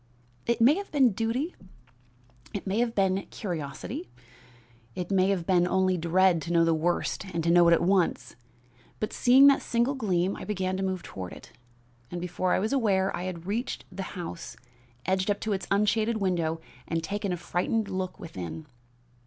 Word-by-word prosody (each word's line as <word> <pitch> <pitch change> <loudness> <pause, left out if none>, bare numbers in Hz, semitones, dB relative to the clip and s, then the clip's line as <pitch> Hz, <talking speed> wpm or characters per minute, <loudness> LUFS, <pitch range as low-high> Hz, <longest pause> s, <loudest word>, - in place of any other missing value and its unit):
It 235 - +1
may 240 +5 +6
have 400 0 -6
been 270 -6 +4
duty; 230 - -1 1.0
it 200 - -4
may 195 +3 0
have 235 -1 0
been 195 -1 +1
curiosity; 155 - -5 0.9
it 180 +1 -4
may 190 0 +3
have 185 -4 0
been 180 -1 +3
only 185 0 +2
dread 175 0 +3
to 165 - -5
know 170 -1 +4
the 165 - +3
worst 170 +4 0
and 165 0 +1
know 175 0 +6
it 170 - +6
at 170 - +3
once; 185 -1 +1 0.6
but 215 - -3
seeing 260 +2 +6
that 280 -1 +6
single 235 +3 +1
gleam 195 -7 0
I - - -8
began 190 -3 -2
to - - -3
move 185 -2 -2
toward 90 -3 -7
it, 75 - -13 0.6
and, 175 - -5
before 180 +1 -1
I - - +3
was 215 +6 -1
aware, 195 -7 +2
I 180 - -4
had 175 -2 -5
reached 225 +7 -3
the 190 +1 -6 0.2
house, 170 - -6 0.5
edged 190 +1 0
up 205 - +1
to 220 - -1
its 190 - -3
unshaded 215 +3 +2
window 170 -5 0 0.3
and 165 0 -1
taken 200 +2 -2
a 180 - -1
frightened 180 +5 -1
look 185 -1 -4
within. 150 - -7
190 Hz, 180 wpm, -28 LUFS, 175-210 Hz, 1.0 s, may